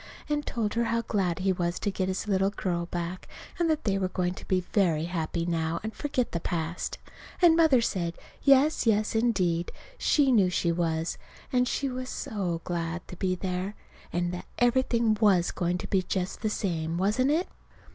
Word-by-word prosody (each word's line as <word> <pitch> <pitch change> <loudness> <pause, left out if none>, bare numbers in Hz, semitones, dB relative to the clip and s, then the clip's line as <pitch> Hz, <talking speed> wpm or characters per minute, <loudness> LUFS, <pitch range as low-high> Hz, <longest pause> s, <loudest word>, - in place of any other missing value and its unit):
and 295 -1 -1
told 220 -4 -1
her 235 0 +1
how 230 0 0
glad 185 -7 0
he 190 0 +1
was 175 -1 -1
to 205 - -1
get 190 -1 -1
his 190 +3 -2
little 195 -1 +2
girl 175 -4 -2
back, 175 +1 -4 0.3
and 340 -1 +2
that 310 -1 +1
they 195 -2 +1
were 190 - +1
going 180 -1 -1
to - - -11
be 185 -1 +2
very 165 -6 +2
happy 170 -1 -2
now 165 -1 -1
and 220 0 -4
forget 260 -4 -1
the 170 - -1
past. 165 0 -3 0.4
And 345 -3 +6
Mother 315 -7 +5
said, 175 -6 -1 0.3
yes, 275 -1 +4
yes, 215 -1 +2
indeed, 185 -7 +1 0.3
she 280 -3 +3
knew 200 -7 +5
she 175 -1 +1
was; 165 -1 -1 0.3
and 250 0 +3
she 275 - -1
was 255 0 -4
so 180 -6 -3
glad 170 -1 -3
to - - -7
be 185 0 0
there, 185 +2 -3 0.4
and 175 0 -1
that 180 - -6
everything 235 -3 +2
was 190 -5 +4
going 175 0 -1
to - - -6
be 190 - +2
just 185 0 -3
the 215 - 0
same, 165 -5 -2
wasn't 210 +8 +2
it? 325 +5 +1
190 Hz, 190 wpm, -28 LUFS, 175-230 Hz, 0.4 s, And